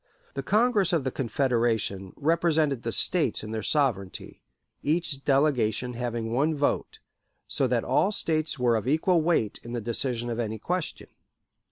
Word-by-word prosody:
The - - -3
Congress 210 -4 +2
of 160 -5 +2
the 130 - -2
Confederation 115 -7 0
represented 155 -3 +1
the 115 - -3
States 155 -4 +2
in 110 - -7
their 110 0 -3
sovereignty, 110 -7 -1 0.4
each 150 -2 -1
delegation 125 -4 +1
having 120 -2 -3
one 150 +5 +1
vote, 145 0 -1 0.5
so 135 - 0
that 120 -2 0
all - - +2
the - - -3
States 155 -6 -1
were 120 -2 +2
of 110 +2 -2
equal 160 +4 +2
weight 155 -11 +1
in 120 - -8
the 120 - -2
decision 120 +1 -1
of 115 - -3
any 110 -1 -2
question. 175 - -4
130 Hz, 160 wpm, -26 LUFS, 115-155 Hz, 0.5 s, Congress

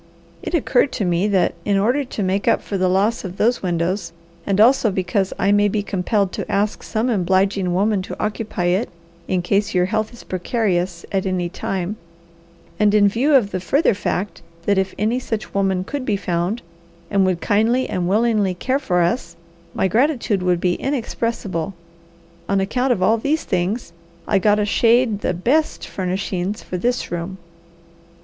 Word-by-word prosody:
It - - -3
occurred 275 -3 +2
to 205 - -1
me 175 +3 +1
that, 190 -4 +2
in 200 -1 +1
order 245 +9 +2
to 235 -5 -4
make 190 +2 -1
up - - +3
for 200 - -4
the 185 -1 +2
loss 205 +6 +1
of 185 -1 -7
those 240 +3 +2
windows, 175 0 -1 0.3
and 200 0 +1
also 235 +1 +5
because 190 0 -1
I 200 - +2
may 205 0 +4
be 205 0 -1
compelled 200 0 0
to - - -5
ask 205 +2 0
some 220 +2 -1
obliging 190 -3 +1
woman 200 +2 +1
to 185 - -8
occupy 210 -3 -3
it 205 +6 0 0.4
in 180 -2 0
case 200 +2 0
your 180 0 +4
health 215 +2 -1
is 235 - -13
precarious 180 -3 -1
at 195 -1 0
any 180 -2 -1
time, 190 +2 -3 0.8
and 210 0 +4
in 205 -1 +6
view 270 +8 +2
of 215 -7 +3
the 185 - -2
further 275 - +2
fact 195 -1 -3 0.2
that 200 -1 +3
if 190 0 -2
any 220 +4 +1
such 225 -4 -5
woman 190 -2 +1
could 280 +7 -4
be 215 -5 0
found, 185 +5 -2 0.5
and 200 -1 +3
would 180 -2 0
kindly 225 +7 +2
and 180 -1 -2
willingly 210 -3 +2
care 260 +9 0
for 180 -10 +1
us, 235 +9 -1 0.4
my - - +2
gratitude 235 - +1
would 180 -1 +1
be 180 0 +1
inexpressible; 230 - -2 0.7
on 195 0 +2
account 250 +7 0
of 185 -6 +1
all 220 +4 +3
these 295 +7 0
things, 185 +2 -2 0.3
I 200 - +3
got 210 +2 +3
a 210 - +1
shade 230 0 +3
the 180 - -1
BEST 275 - 0
furnishings 185 +1 -3
for 180 - -4
this 245 +3 -1
room." 175 +2 -4
200 Hz, 180 wpm, -20 LUFS, 185-225 Hz, 0.8 s, in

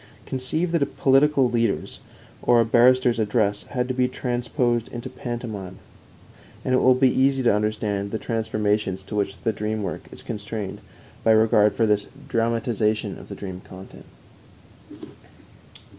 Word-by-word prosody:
Conceive 155 +7 -1
that 170 -3 +1
a 140 - +2
political 135 0 +3
leader's 115 -3 -1 0.4
or 120 -1 +4
a 115 - +4
barrister's 120 +1 +4
address 105 -1 0
had 125 -2 -2
to 130 - -2
be 125 0 +2
transposed 120 -2 -1
into 120 +1 -7
pantomime, 110 -6 -6 0.9
and 130 - +1
it 130 - +4
will 130 0 +5
be 130 +1 +4
easy 135 0 +2
to 120 - +4
understand 105 -1 -1
the 110 - -2
transformations 105 -4 -1
to 100 - -7
which 100 -1 -1
the 110 - 0
dream 105 +1 -3
work - - -5
is - - -10
constrained 105 -2 -5 0.4
by - - +2
regard 110 -1 +4
for 115 - +2
this 105 -1 +1 0.2
dramatization 115 -2 0
of - - -13
the - - -6
dream 95 -2 -7
content. 95 +1 -13
115 Hz, 150 wpm, -24 LUFS, 105-125 Hz, 0.9 s, will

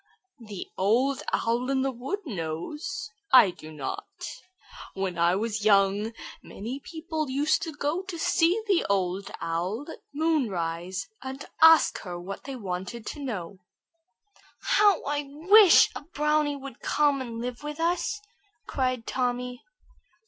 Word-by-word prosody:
"The 200 -4 -6
Old 250 +8 +2
Owl 240 +3 0
in 265 -1 +1
the 270 - 0
woods 270 - -4
knows; 215 - -5 0.2
I 250 -8 +8
do 155 -2 -12
not. 145 -4 -5 0.9
When 190 -3 -2
I 170 +2 +4
was 215 +1 -2
young 205 +1 +3 0.3
many 235 +7 -6
people 315 -1 -4
used 285 +4 +2
to 325 - -4
go 295 +4 -2
to 380 -2 -7
see 340 +4 +3
the 390 -5 +2
Old 195 0 0
Owl 185 - -2
at - - -10
moon 310 -4 +1
rise, 175 +1 -3
and 265 +1 -6 0.2
ask 325 0 +7
her 175 -2 -6
what 190 +3 -7
they 275 -1 -5
wanted 195 +1 -5
to 295 - -6
know." 195 -7 -5 1.0
"How 420 -6 +4
I 290 0 -2
wish 365 +7 +7
a - - -5
brownie 300 -1 0
would 275 -3 -9
come 290 -2 +2
and 235 -3 -6
live 245 0 -5
with 295 +1 -6
us!" 355 +5 0 0.4
cried 255 -3 -1
Tommy. 250 -1 -2
255 Hz, 140 wpm, -27 LUFS, 195-300 Hz, 1.0 s, I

